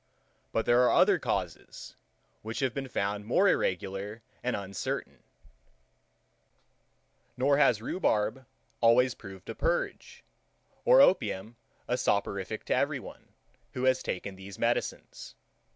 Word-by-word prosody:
But 115 - 0
there 120 +1 +4
are 125 - +4
other - - +5
causes, - - -4 0.5
which 110 +4 -5
have 130 -3 0
been 135 -1 -4
found 100 -4 -2
more 125 - +3
irregular 100 - -1 0.2
and 125 - -1
uncertain; 100 -1 -5 2.2
nor 140 +2 +3
has 115 -7 +3
rhubarb 130 - -1 0.3
always 120 +2 +5
proved 95 -5 -12
a 115 - -4
purge, 470 - -2 0.6
or - - +7
opium 110 - +2 0.3
a 125 - 0
soporific 100 -1 -1
to - - 0
every - - 0
one, - - -13 0.4
who 125 - -4
has 130 0 +3
taken 95 +1 -4
these 95 0 -10
medicines. - - -3
115 Hz, 120 wpm, -29 LUFS, 100-130 Hz, 2.2 s, or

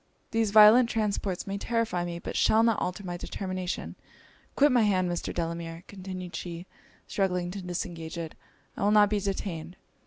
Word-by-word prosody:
'These 225 -1 +1
violent 215 +4 +8
transports 205 -5 -1
may 200 0 -4
terrify 230 -6 -1
me, 175 -1 -4
but - - -6
shall 220 +1 +4
not 230 -2 +3
alter 180 +3 -3
my 175 -2 -4
determination. 185 0 -4 0.6
Quit 290 +1 +5
my 245 -2 +4
hand, 190 -4 +2
Mr. 175 - -3
Delamere,' 165 0 -4
continued 185 -2 -7
she, 170 0 -6 0.4
struggling 180 -3 -1
to 195 +1 -6
disengage 175 -2 -5
it 165 -2 -5 0.4
'I - - -5
will 205 - +4
not 210 -1 +5
be 210 - +2
detained.' 185 -4 -4
185 Hz, 165 wpm, -28 LUFS, 175-210 Hz, 0.6 s, violent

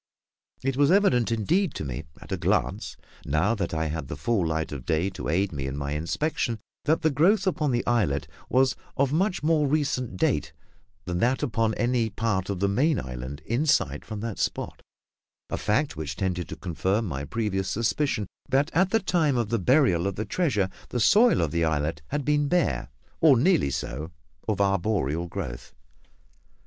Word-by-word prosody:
It 135 0 -1
was 145 0 +4
evident 165 - +3
indeed 160 - +1
to - - -4
me 65 +3 -5
at - - -13
a - - +1
glance, - - -1 0.3
now 80 +10 +1
that 100 -6 -2
I 80 0 -1
had 80 -2 -3
the 75 - -6
full 90 +3 +1
light 80 0 -2
of 70 -4 -6
day 85 +6 0
to 90 - -5
aid 95 +5 +1
me 70 -4 -4
in 70 +1 -4
my 70 0 -3
inspection, 85 - -1 0.3
that 160 +2 +2
the 160 - +3
growth 180 - +3
upon 160 -6 +1
the 120 -1 0
islet 105 -13 +1 0.2
was 130 0 +3 0.2
of 140 0 +2
much 185 +2 +1
more 155 -2 +3
recent 135 -8 -1
date - - 0 0.5
than 90 -1 -2
that 125 +5 +1
upon 115 -2 0
any 120 -2 +1
part 100 -3 -1
of 100 -3 -2
the 100 - +3
main 135 +9 +2
island 65 +3 -6
in 125 +8 0
sight 150 - +2
from 110 -2 -6
that 115 -3 -4
spot; - - -2 0.7
a - - -1
fact 130 +8 0
which 80 -1 -4
tended 90 -2 -2
to - - -5
confirm 95 +6 -1
my 70 -7 -4
previous 95 +2 -2
suspicion 110 +2 0 0.2
that 140 +4 +2
at 185 +2 +3
the 225 - +3
time 160 - +1
of 115 -3 0
the 115 0 +1
burial 100 - +3
of 100 - -2
the 110 - -3
treasure 105 - 0 0.2
the 120 - -2
soil 210 - +5
of 75 - -1
the 85 0 +1
islet 80 0 0
had 145 -2 -3
been 145 0 +2
bare, 175 +1 +1 0.3
or 150 -5 +6
nearly 160 - +3
so, 70 +3 -4 0.4
of 105 -3 0
arboreal 95 -5 +1
growth. 65 -5 -6
110 Hz, 185 wpm, -26 LUFS, -, 0.7 s, or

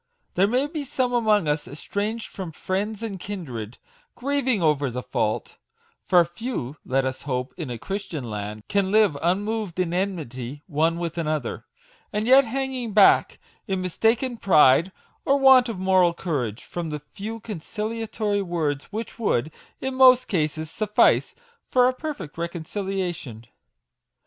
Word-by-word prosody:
There 195 +2 +3
may 250 +6 +1
be 300 0 -4
some 255 -2 -1
among 215 -7 +3
us 150 0 -1
estranged 205 +9 -3
from 185 -5 -6
friends 200 +6 -3
and 200 -4 -4
kindred, 130 - -6 0.4
grieving 265 -3 0
over 150 -5 +2
the 125 +1 -5
fault, - - -2 0.4
(for 175 -2 +5
few, 170 - -5
let 135 +1 0
us 130 0 -3
hope, 125 -2 -3
in 160 -7 -5
a 120 - -4
Christian 190 - -5
land, 105 0 -6
can 200 -2 +1
live 210 -6 +4
unmoved 200 +1 -1
in 175 -2 0
enmity 150 -8 -3
one 165 +1 +1
with 170 0 -3
another,) 155 -6 -2 0.5
and 210 +1 -1
yet 265 +3 +7
hanging 255 -2 -3
back, 205 -2 +5 0.3
in 190 -1 -1
mistaken 225 +7 +1
pride 160 -2 +5 0.3
or 275 - +3
want 265 -2 +6
of 225 - -4
moral 185 -2 +3
courage, 130 - -3
from 170 -2 -5
the 150 -1 -4
few 220 +3 -5
conciliatory 215 +1 -3
words 160 -6 -2
which 220 +2 -6
would, 155 - 0 0.3
in 265 0 -2
most 255 -1 +6
cases, 155 -3 -1
suffice 210 -1 +2 0.3
for 250 -1 +5
a 255 - +2
perfect 255 - -6
reconciliation. 170 - -4
190 Hz, 145 wpm, -24 LUFS, 155-225 Hz, 0.5 s, yet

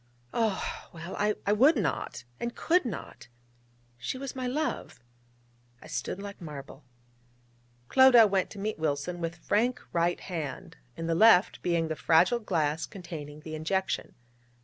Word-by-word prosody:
Oh, 220 -4 -1
well, 170 +2 -7
I 210 -1 0
would 270 +9 +5
not, 140 - -2 0.2
and 235 0 -3
could 350 -2 +2
not! 195 - -6 0.7
she 120 - -3
was 270 0 -6
my 255 -1 -3
love 300 +5 -3 0.8
I - - -15
stood - - -4
like 200 -1 -8
marble... 145 -3 -9 1.0
Clodagh 245 - +7
went 190 -2 +1
to - - -11
meet 210 -2 -3
Wilson 155 +3 -2
with 165 0 -3
frank 225 +8 0
right 170 +1 +1
hand, 160 -8 -6 0.2
in 165 - -4
the 165 - +1
left 200 +1 +5
being 170 -2 +1
the 160 - -2
fragile 170 +10 +4
glass 160 -7 -1
containing 155 -5 -8
the 155 0 -8
injection. 190 +5 -2
180 Hz, 145 wpm, -29 LUFS, 160-225 Hz, 1.0 s, Clodagh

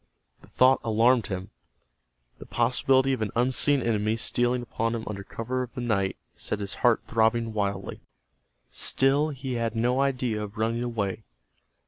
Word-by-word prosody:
The - - -17
thought 130 +1 +4
alarmed 115 +1 +3
him. 95 -1 -5 0.9
The - - -11
possibility 130 +2 +2
of 130 - -3
an 110 - -1
unseen 130 +3 +2
enemy 110 -1 0
stealing 120 +2 0
upon 115 0 -2
him 115 - -4
under 100 -2 -5
cover 125 +5 -4
of 125 +1 -7
the 125 - -4
night 100 -5 0 0.2
set 105 - -2
his 100 -1 -3
heart 120 -2 +3
throbbing 115 0 +1
wildly. 100 -2 -3 0.7
Still 140 +3 +2
he 135 -3 -5
had 115 -1 -2
no 125 +4 +1
idea 125 -5 0
of 105 +1 -7
running 115 +2 0
away. 110 -3 -3
115 Hz, 155 wpm, -26 LUFS, 110-125 Hz, 0.9 s, thought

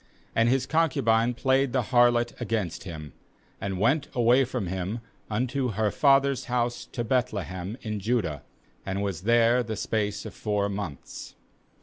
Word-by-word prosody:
2And 115 +1 +4
his 130 +1 +2
concubine 120 -8 +2
played 130 0 +2
the 130 -2 +2
harlot 120 -1 +4
against 110 -7 -2
him, 80 -5 -8 0.5
and 95 -2 -3
went 130 +8 +2
away 120 +2 +5
from 125 -4 -3
him 95 +5 -3 0.3
unto 125 +2 -1
her 105 0 +1
father's 140 -2 +3
house 120 -1 -1
to 120 - -3
Beth 125 +1 +1
lehem 95 +1 -5
in 105 -2 -3
Judah, 100 - -1 0.4
and 95 +1 -2
was 95 -5 -3
there 120 +1 +5
the 110 -2 -4
space 105 -1 -2
of - - -7
four 105 -2 -1
months. 95 -8 -6
115 Hz, 150 wpm, -27 LUFS, 100-125 Hz, 0.5 s, away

